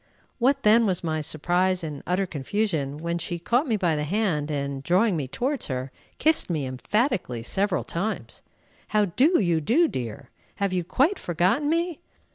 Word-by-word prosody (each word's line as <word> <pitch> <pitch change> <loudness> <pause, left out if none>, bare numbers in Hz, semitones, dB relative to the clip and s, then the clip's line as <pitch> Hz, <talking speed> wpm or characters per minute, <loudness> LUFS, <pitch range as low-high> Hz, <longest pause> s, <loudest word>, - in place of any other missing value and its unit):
What 275 +3 +2
then 220 +1 +5
was 185 -3 -1
my 155 -2 -1
surprise 175 +4 0
and 150 -3 -5
utter 185 +3 +1
confusion 155 -2 -2
when 170 +2 -2
she 170 +1 -4
caught 240 - +1
me 225 -4 +1
by 175 -5 +1
the 150 - -1
hand, 160 -4 0
and, 140 -2 -3
drawing 185 +7 +2
me 145 -5 -2
towards 260 - -2
her, 130 0 -4 0.3
kissed 315 -7 +2
me 155 -5 -1
emphatically 130 - -1
several 195 - 0
times. 200 +6 -4 0.5
"How 210 -1 +2
do 275 - +3
you 170 -5 +1
do, 295 - +3
dear? 125 - -6 0.2
Have 200 -2 -1
you 180 -1 0
quite 280 - +1
forgotten 185 - +1
me? 335 0 0
180 Hz, 170 wpm, -25 LUFS, 150-225 Hz, 0.5 s, then